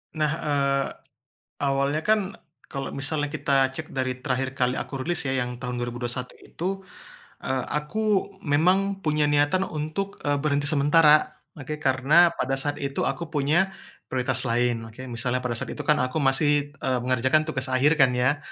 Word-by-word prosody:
Nah, 155 Hz, -1 st, +1 dB
eee, 140 Hz, -2 st, +1 dB, 0.8 s
awalnya 140 Hz, +2 st, +1 dB
kan, 215 Hz, -1 st, +1 dB, 0.3 s
kalo 135 Hz, -1 st, -5 dB
misalnya 145 Hz, +2 st, -1 dB
kita 135 Hz, -1 st, +2 dB
cek 160 Hz, 0 st, -6 dB
dari 130 Hz, -1 st, -1 dB
terakhir 130 Hz, -1 st, -1 dB
kali 125 Hz, -1 st, +1 dB
aku 135 Hz, -2 st, -4 dB
rilis 175 Hz, -1 st, -1 dB
ya, 135 Hz, -, 0 dB
yang 125 Hz, -1 st, -2 dB
tahun 125 Hz, 0 st, -4 dB
2021 120 Hz, +1 st, -4 dB
itu, 175 Hz, +3 st, -5 dB, 0.8 s
eee, 130 Hz, -1 st, -1 dB
aku 200 Hz, +7 st, 0 dB
memang 190 Hz, +5 st, +1 dB
punya 150 Hz, -2 st, +2 dB
niatan 145 Hz, +6 st, +2 dB
untuk 155 Hz, +6 st, -4 dB
eee, 145 Hz, -1 st, +1 dB
berhenti 145 Hz, -1 st, +1 dB
sementara. 150 Hz, +1 st, +4 dB, 0.2 s
Oke, 150 Hz, +2 st, -5 dB
karena 145 Hz, +6 st, +4 dB
pada 135 Hz, +1 st, -1 dB
saat 145 Hz, +1 st, -2 dB
itu 140 Hz, 0 st, -2 dB
aku 135 Hz, +5 st, -3 dB
punya, 155 Hz, +6 st, +2 dB, 0.3 s
prioritas 130 Hz, 0 st, -1 dB
lain, 120 Hz, -1 st, 0 dB
oke. 115 Hz, +3 st, -11 dB
Misalnya 125 Hz, +2 st, -1 dB
pada 120 Hz, -2 st, -2 dB
saat -, -, -4 dB
itu -, -, -5 dB
kan 150 Hz, -, +3 dB
aku 130 Hz, +4 st, 0 dB
masih, 145 Hz, +1 st, +2 dB
e -, -, -3 dB
mengerjakan 130 Hz, +4 st, +2 dB
tugas 155 Hz, -5 st, -3 dB
akhir 135 Hz, +4 st, +2 dB
kan 130 Hz, -2 st, +5 dB
ya. 125 Hz, +4 st, +2 dB
140 Hz, 160 wpm, -25 LUFS, 130-155 Hz, 0.8 s, kan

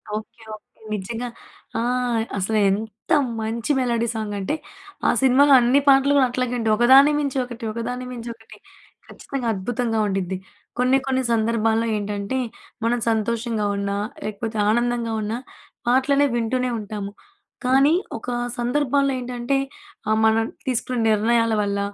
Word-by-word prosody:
Okay. 230 Hz, +2 st, -8 dB
Okay. 215 Hz, -, -17 dB, 0.3 s
నిజంగా. 225 Hz, +4 st, -4 dB, 0.5 s
ఆ! -, -, 0 dB, 0.6 s
అసలు 215 Hz, +3 st, 0 dB
ఎంత 215 Hz, -, -4 dB, 0.3 s
మంచి 230 Hz, +5 st, -2 dB
మెలోడీ 235 Hz, -2 st, 0 dB
సాంగ్ 215 Hz, -2 st, -3 dB
అంటే, 195 Hz, +10 st, -1 dB, 0.5 s
ఆ -, -, +5 dB
సినిమాలో 275 Hz, +2 st, +5 dB
అన్ని 245 Hz, +3 st, +4 dB
పాటలు 275 Hz, +1 st, +5 dB
కూడా 265 Hz, -2 st, +5 dB
అట్లాగే 250 Hz, 0 st, -1 dB
ఉంటాయి. 220 Hz, -1 st, +2 dB
ఒకదాన్ని 265 Hz, +5 st, +7 dB
మించి 280 Hz, -2 st, -2 dB
ఒకటి, 240 Hz, -1 st, -10 dB
ఒకదాన్ని 245 Hz, +3 st, -4 dB
మించి 235 Hz, -1 st, -6 dB
ఒకటి 225 Hz, -1 st, -16 dB, 0.5 s
ఖచ్చితంగా 265 Hz, -4 st, -5 dB
అద్భుతంగా 225 Hz, +3 st, -1 dB
ఉండిద్ది. 190 Hz, -1 st, -2 dB, 0.4 s
కొన్ని, 255 Hz, +2 st, +4 dB
కొన్ని 260 Hz, 0 st, +1 dB
సందర్భాల్లో 225 Hz, 0 st, +1 dB
ఏంటంటే 205 Hz, +4 st, -3 dB, 0.5 s
మనం 240 Hz, +1 st, +1 dB
సంతోషంగా 225 Hz, 0 st, -1 dB
ఉన్నా, 200 Hz, 0 st, -2 dB, 0.3 s
లేకపోతే 215 Hz, +1 st, -4 dB
ఆనందంగా 240 Hz, 0 st, 0 dB
ఉన్నా 215 Hz, +3 st, -2 dB, 0.5 s
పాటలనే 275 Hz, +3 st, +3 dB
వింటూనే 250 Hz, +2 st, 0 dB
ఉంటాము. 205 Hz, -1 st, -6 dB, 0.5 s
కానీ 270 Hz, +4 st, +4 dB, 0.2 s
ఒక 225 Hz, -, -11 dB, 0.3 s
సందర్భంలో 275 Hz, +2 st, +1 dB
ఏంటంటే 245 Hz, +1 st, -2 dB, 0.5 s
ఆ! -, -, +3 dB
మనం 220 Hz, 0 st, +4 dB, 0.2 s
తీసుకున్న 250 Hz, -1 st, -1 dB
నిర్ణయాల 230 Hz, +2 st, +2 dB
వల్ల, 200 Hz, 0 st, -1 dB
235 Hz, 130 wpm, -22 LUFS, 220-255 Hz, 0.6 s, ఒకదాన్ని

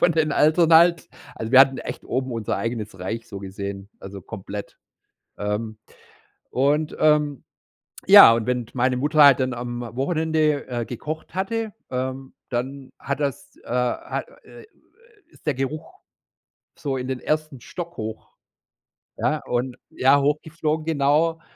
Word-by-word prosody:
von 170 Hz, -, +4 dB
den 155 Hz, -1 st, +1 dB
Eltern 155 Hz, +3 st, +3 dB
halt. 170 Hz, 0 st, +5 dB, 0.3 s
Also, 110 Hz, +2 st, -6 dB
wir 130 Hz, -, +9 dB
hatten 135 Hz, 0 st, +5 dB
echt -, -, -7 dB
oben 130 Hz, +1 st, -2 dB
unser 115 Hz, -2 st, -2 dB
eigenes 110 Hz, -2 st, -4 dB
Reich 110 Hz, +5 st, -5 dB
so 100 Hz, -, -7 dB
gesehen, 100 Hz, +1 st, -7 dB
also, 100 Hz, 0 st, -9 dB
komplett. 100 Hz, +1 st, -8 dB, 0.6 s
Ähm, 105 Hz, +1 st, -3 dB, 0.7 s
und, 145 Hz, +4 st, +1 dB
ähm 150 Hz, -3 st, +2 dB, 0.6 s
ja, 115 Hz, -, +10 dB
und 115 Hz, -1 st, -1 dB
d -, -, -12 dB
wenn 125 Hz, -1 st, -2 dB
meine 125 Hz, 0 st, +1 dB
Mutter 150 Hz, +3 st, +4 dB
halt 140 Hz, -2 st, +7 dB
dann 130 Hz, -1 st, -1 dB
am 120 Hz, 0 st, -5 dB
Wochenende, 155 Hz, 0 st, 0 dB
äh, 120 Hz, -2 st, -3 dB
gekocht 155 Hz, +9 st, -7 dB
hatte, 220 Hz, +3 st, -2 dB, 0.2 s
ähm, 130 Hz, +1 st, -4 dB, 0.2 s
dann 130 Hz, +2 st, -4 dB
hat 140 Hz, 0 st, -4 dB
das, 140 Hz, -4 st, -4 dB
äh -, -, -17 dB
ha 125 Hz, 0 st, -1 dB, 0.2 s
äh, -, -, -14 dB
äh, -, -, -16 dB, 0.6 s
ist -, -, -23 dB
der 150 Hz, -, +1 dB
Geruch 135 Hz, +4 st, -4 dB, 0.9 s
so 135 Hz, -2 st, -3 dB
in 125 Hz, 0 st, -4 dB
den 130 Hz, -, -3 dB
1. 155 Hz, -3 st, -2 dB
Stock 170 Hz, +5 st, -8 dB
hoch. 110 Hz, 0 st, -7 dB, 0.8 s
Ja, -, -, 0 dB
und 125 Hz, +1 st, -2 dB
Ja, 135 Hz, +2 st, +4 dB
hochgeflogen, 155 Hz, +2 st, -1 dB
genau. 160 Hz, +2 st, +1 dB
135 Hz, 150 wpm, -23 LUFS, 120-155 Hz, 0.9 s, ja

